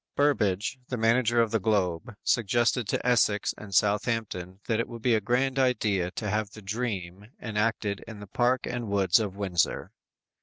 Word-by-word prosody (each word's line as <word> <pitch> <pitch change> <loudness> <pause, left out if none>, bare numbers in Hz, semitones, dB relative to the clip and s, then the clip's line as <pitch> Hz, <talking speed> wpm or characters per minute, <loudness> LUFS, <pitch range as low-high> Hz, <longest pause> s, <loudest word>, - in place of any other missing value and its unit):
Burbage, 120 -5 +1
the 125 - -3
manager 115 +1 +3
of 110 - -3
the 115 - +2
Globe, 100 +1 0
suggested 120 +1 +1
to - - -2
Essex 115 -4 +2
and 105 -2 -11
Southampton 100 -3 0
that 115 -1 0
it 115 - -1
would 115 -2 -9
be 125 - +3
a 110 - +2
grand 130 +5 +1
idea 105 -8 +1
to 105 +3 -5
have 105 0 -1
the 110 - -12
"Dream" 100 -3 -4
enacted 105 -2 -1
in 110 -2 -9
the 105 - -8
park 120 +5 +1
and 120 -2 -4
woods 100 +4 +3
of 100 -3 -3
Windsor! 95 -4 0
110 Hz, 175 wpm, -27 LUFS, 100-120 Hz, -, manager